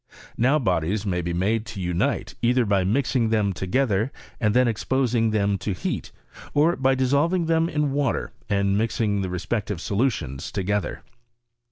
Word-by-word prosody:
Now 130 +6 +3
bodies 95 - 0
may 90 -3 0
be 85 0 -3
made 100 +6 0
to 115 -4 -7
unite, 90 -1 -1
either 125 +1 +3
by 100 -2 +2
raising 120 +3 +1
them 105 -3 +1
together, 110 +4 0 0.3
and 105 -1 +1
then 125 0 +5
exposing 120 0 +1
them 100 -2 +1
to 100 +1 -2
heat, 90 - -4 0.4
or 160 +4 +4
by 135 0 +2
dissolving 145 +7 +2
them 165 0 +2
in 150 -3 0
water 140 -3 -1 0.2
and 100 -1 +2
mixing 105 -1 0
the 95 - -2
respec 100 +5 -2
tive 100 -5 -3
solutions 100 - -1
together. 100 +1 -2
110 Hz, 160 wpm, -24 LUFS, 100-130 Hz, 0.4 s, then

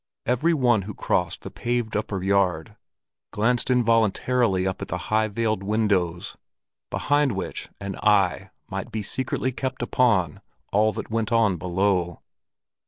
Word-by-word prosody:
Every 155 +8 +2
one 120 -7 +3
who 105 +2 -7
crossed - - -1
the - - -7
paved 120 -2 -2
upper 100 -3 -2
yard, 95 -5 +1 0.5
glanced 120 +5 0
involuntarily 115 -3 +2
up 95 -1 -2
at - - -4
the - - -3
high 110 0 0
veiled 110 -1 -1
windows, 100 -5 0 0.5
behind 145 -3 +1
which 95 - -5
an 100 -1 -5
eye 100 -4 +2 0.2
might - - -4 0.2
secretly 130 +3 -2
be - - -17
kept 130 -2 -3
upon 105 - +1 0.3
all 110 +2 +3
that - - -6
went 115 0 -1
on 110 -6 +3
below. 90 0 0
110 Hz, 140 wpm, -24 LUFS, 95-120 Hz, 0.5 s, one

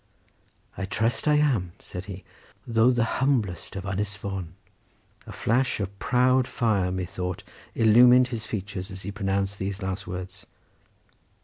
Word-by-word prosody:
"I 95 - -1
trust 115 +8 -1
I 150 - +5
am," 125 - +1
said 90 +1 -8
he; 95 -3 -8 0.4
"though 115 +1 +4
the 120 -2 +2 0.2
humblest 110 - 0
of 95 - -4
Ynys 100 +1 -2
Fon." 95 -4 -5 0.7
A - - -7
flash 125 +2 0
of 100 -1 -4
proud 130 +1 +3
fire, 100 -6 +1
methought, 90 -1 -4 0.3
illumined 125 +3 +6
his 110 -3 -5
features 100 -2 -4
as 95 -1 -8
he 100 - -4
pronounced 100 0 -1
these 100 +1 -3
last 95 +1 -4
words. 90 +3 -7
100 Hz, 140 wpm, -26 LUFS, 95-120 Hz, 0.7 s, illumined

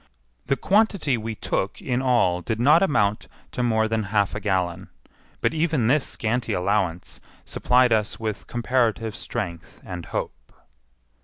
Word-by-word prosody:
The 140 - +2
quantity 195 - +2
we 110 -1 -4
took - - -2
in 125 0 -1
all 120 -9 +2
did 110 +5 -3
not 150 +7 +5
amount 105 - +1 0.2
to - - -3
more 110 -2 +2
than 110 -1 -1
half 100 -2 +1
a 105 - -3
gallon; 95 -5 -1 0.5
but - - +1
even 155 -6 +1
this 135 +4 +2
scanty 115 +2 -2
allowance 90 -2 -1 0.2
supplied 125 -1 +3
us 105 -1 0
with 110 -2 -4
comparative 120 -2 0
strength 85 -2 -6
and 90 -2 -7
hope. - - -5
110 Hz, 145 wpm, -24 LUFS, 100-125 Hz, 0.5 s, not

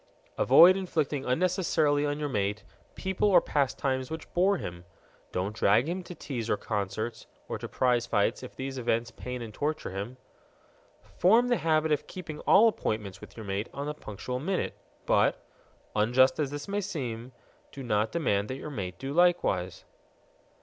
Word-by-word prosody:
Avoid 185 +3 +7
inflicting 155 -7 -1
unnecessarily 155 -1 +2
on 145 +1 -2
your 150 - -1
mate 105 -4 -1 0.3
people 190 +2 0
or 180 -3 +7
pastimes 130 -3 -1
which 160 0 -7
bore 190 +3 +3
him. 85 - -7 0.5
Don't 95 +4 -2
drag 110 +6 +3
him 180 +3 -2
to 180 0 -10
teas 120 -7 -5
or 105 - +2
to - - -19
concerts 105 +2 -3 0.2
or - - -4
to - - -5
prize 125 -2 +1
fights 100 -3 +1
if 125 - -10
these 135 0 -5
events 115 -1 0
pain 125 +1 -6
and 110 -2 -8
torture 150 -1 -2
him. 100 +7 -5 1.0
Form 230 +7 +5
the 245 - +3
habit 155 -1 +1
of 150 - 0
keeping 160 -5 -7
all 230 - +7
appointments 105 - -2
with - - -13
your 110 - -7
mate 100 +2 -3
on 140 +2 -3
the 150 - -3
punctual 125 0 -6
minute. 185 +7 -2 0.3
But - - +3 0.6
(unjust 125 +6 +4
as 145 -3 0
this 145 +1 -6
may 200 +1 -1
seem) 125 - -5 0.4
do 135 - -8
not 110 -2 +1
demand 105 -11 0
that 130 - -4
your 150 - -7
mate 90 -8 -5
do 135 +4 -5
likewise. 170 - +2
135 Hz, 170 wpm, -28 LUFS, 110-160 Hz, 1.0 s, Avoid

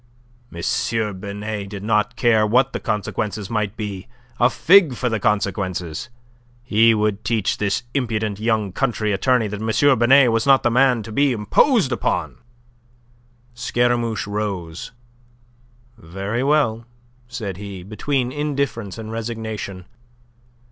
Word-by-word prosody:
M. 105 +4 -2
Binet 100 0 -5
did 100 -1 -7
not 105 +1 +1
care 115 -4 +3
what 125 +5 +2
the - - -2
consequences 105 0 -3
might 105 -2 -2
be. 100 -4 -5 0.3
A 120 - +5
fig 165 -2 +5
for 125 +1 -1
the 110 -1 -1
consequences! 95 -3 -2 0.5
He 115 -1 +4
would 105 -1 -1
teach 110 -4 0
this 100 +2 0
impudent 110 -6 -1
young 110 -3 0
country 110 -1 -1
attorney 120 +3 +2
that 105 0 -6
M. 120 +4 +3
Binet 130 +1 +6
was 115 +3 0
not 135 -1 +5
the 120 - +2
man 125 -2 +3
to 110 - -9
be 140 +5 +2
imposed 130 - +2
upon. 85 - -2 1.1
Scaramouche 120 -2 0
rose. 100 -5 -4 1.1
"Very 100 +5 -4
well," 130 -6 +1 0.4
said 105 -6 -5
he, 100 -2 -8
between 125 +6 -2
indifference 140 -8 -3
and 110 -1 -7
resignation. 110 -5 -5
110 Hz, 125 wpm, -21 LUFS, 100-120 Hz, 1.1 s, Binet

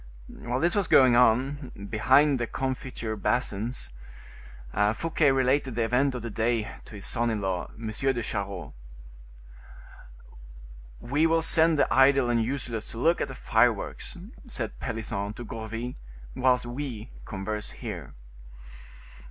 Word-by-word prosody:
While 120 +1 -4
this 170 +4 +2
was 200 -4 +1
going 130 -3 +6
on, 125 -2 +2
behind 135 +5 +4
the 120 - -1
confiture 130 -4 -3
basins, 115 - -2 1.0
Fouquet 160 -2 +2
related 130 -1 +1
the 115 - +1
event 130 +4 +2
of 120 - -5
the 115 - -4
day 115 0 0
to 110 - -11
his 100 - -7
son 120 -1 +1
in 110 -2 -1
law, 95 -2 -2
M. 115 - -8
de 125 +1 -1
Charost. 100 - -4 2.3
"We 145 - +1
will 165 0 +2
send 160 0 +4
the - - +2
idle 135 -2 +5
and 115 -1 +2
useless 120 -3 -3
to - - -8
look 165 +8 +2
at - - 0
the 130 - -8
fireworks," 115 - 0 0.3
said 120 - -5
Pelisson 110 -3 -3
to 120 +2 -8
Gourville, 115 +2 -5 0.4
"whilst 125 -1 +2
we 120 -2 -5
converse 105 +1 -4
here." - - -7
120 Hz, 135 wpm, -27 LUFS, 110-135 Hz, 2.3 s, going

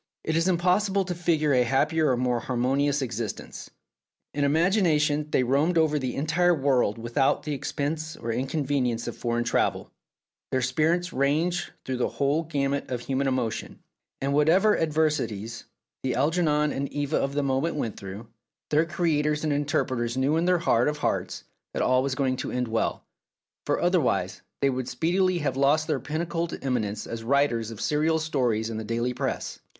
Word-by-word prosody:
It 160 - -1
is 165 +2 +2
impossible 190 +2 +2
to 180 - -3
figure 160 -4 +1
a 125 - +4
happier 150 +5 +2
or 130 - +3
a - - 0
more 125 -1 +1
har 125 - -4
monious 140 +3 +1
existence. 115 -3 -5 0.6
In 145 - 0
imagination 150 -2 +2
they 130 - +2
roamed 145 +7 +2
over 155 -2 +3
the 130 -2 -3
entire 170 +4 +2
world 130 -7 +1
without 120 +4 +1
the 150 - -3
expense 150 +3 -3
or 115 - -6
incon 135 +5 -2
venience 125 -4 0
of - - -4
foreign 120 0 -1
travel: 120 - 0 0.6
their 130 -1 0
spirits 160 +8 +1
ranged 155 +7 +1 0.2
through 130 -1 -2
the 125 - +1
whole 140 +3 +1
gamut 140 -3 -2
of 125 -2 -3
human 135 +2 -1
emotion, 125 -4 -2 0.4
and 140 +1 -1
whatever 175 +9 +4
adversities 150 -9 -1 0.4
the 130 -2 -1
Algernon 150 +1 +2
and 140 0 -3
Eva 145 -1 -1
of 140 +1 -1
the 145 - +1
moment 140 +5 0
went 115 -8 -3
through, 100 +3 -8 0.5
their 155 +2 +3
creators 150 -3 0
and 155 -2 +1
interpreters 130 -4 -1
knew 135 +4 +2
in 165 +1 +1
their 180 0 +4
heart 120 -7 +2
of 150 0 -1
hearts - - -2 0.3
that - - 0
all 130 0 +3
was 135 0 -1
going 130 -2 0
to - - -4
end 125 -1 -1
well, 115 0 -1 0.6
for - - +1
otherwise 125 - +1 0.2
they 140 - +4
would 130 -1 -3
speedily 180 +8 +1
have 145 -5 -1
lost 140 +3 +3
their 155 - -1
pinnacled 165 +2 -3
eminence 110 -6 -1
as 115 -1 -6
writers 120 -3 +1
of 115 -2 -8
serial 155 +2 +1
stories 125 -8 0
in 110 - -4
the 110 - -4
daily 115 +3 -1
press. 130 +1 -3
140 Hz, 175 wpm, -26 LUFS, 125-160 Hz, 0.6 s, a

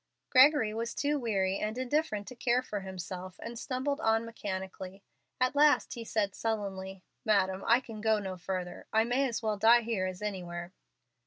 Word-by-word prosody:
Gregory 260 -4 +6
was 230 +1 -3
too 290 0 0
weary 195 -5 0
and 215 +2 -2
indifferent 255 -5 -1
to - - -7
care 245 +1 +1
for 210 -5 -4
himself, 185 -1 -7
and 230 0 -6
stumbled 275 +3 -2
on 225 -3 +2
mechanically. 190 -3 -6 0.4
At 255 +2 +2
last 295 0 +4
he 235 - -6
said, 210 -3 -1
sullenly, 195 -4 -3 0.2
"Madam, 195 -4 +2
I 235 +3 +5
can 225 -4 -9
go 220 0 +3
no 190 -2 -4
further. 180 0 -5
I 220 0 +4
may 255 +3 +1
as 230 -1 -4
well 215 -1 0
die 230 +3 +6
here 220 -5 -1
as 185 +2 -6
anywhere." 175 -3 -5
215 Hz, 175 wpm, -31 LUFS, 190-240 Hz, 0.4 s, Gregory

